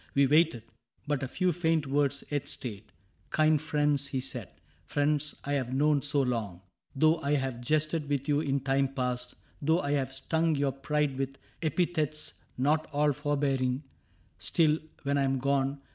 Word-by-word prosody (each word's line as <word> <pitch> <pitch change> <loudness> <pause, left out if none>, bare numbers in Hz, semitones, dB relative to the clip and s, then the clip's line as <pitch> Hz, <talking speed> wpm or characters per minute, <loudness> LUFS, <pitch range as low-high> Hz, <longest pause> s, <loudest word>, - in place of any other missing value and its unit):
We 140 0 +5
waited, 155 -3 +3 0.4
but 145 -2 -1
a 130 - -2
few 180 +7 +1
faint 165 -2 +1
words 140 0 +1
yet 145 -2 -1
stayed: 110 -4 -5 0.2
'' - - -39
Kind 155 -1 +3
friends," 150 -2 +1
he 135 -2 -2
said, 125 -5 -3 0.2
" 75 - -35
friends 150 +1 0
I 140 - -3
have 130 -2 -1
known 145 +1 +3
so 145 -1 +2
long, 110 -8 -2 0.3
Though 155 +4 +4
I 145 +1 +1
have 130 -3 -2
jested 155 +3 0
with 140 -1 -1
you 145 -1 +3
in 140 -3 0
time 135 0 +2
past^ 125 -1 -2 0.3
Though 160 +4 +3
I 145 - -2
have 135 -2 0
stung 160 +3 +1
your 140 -1 +1
pride 140 0 -1
with 135 0 -3 0.2
epithets 155 -2 -1 0.2
Not 150 +4 +2
all 150 0 +2
forbearing, 140 -2 0 0.3
— - - -36
still, 155 -1 +2 0.2
when 140 0 +1
I - - +3
am 135 0 +1
gone. 140 +1 0
145 Hz, 175 wpm, -29 LUFS, 135-150 Hz, 0.4 s, We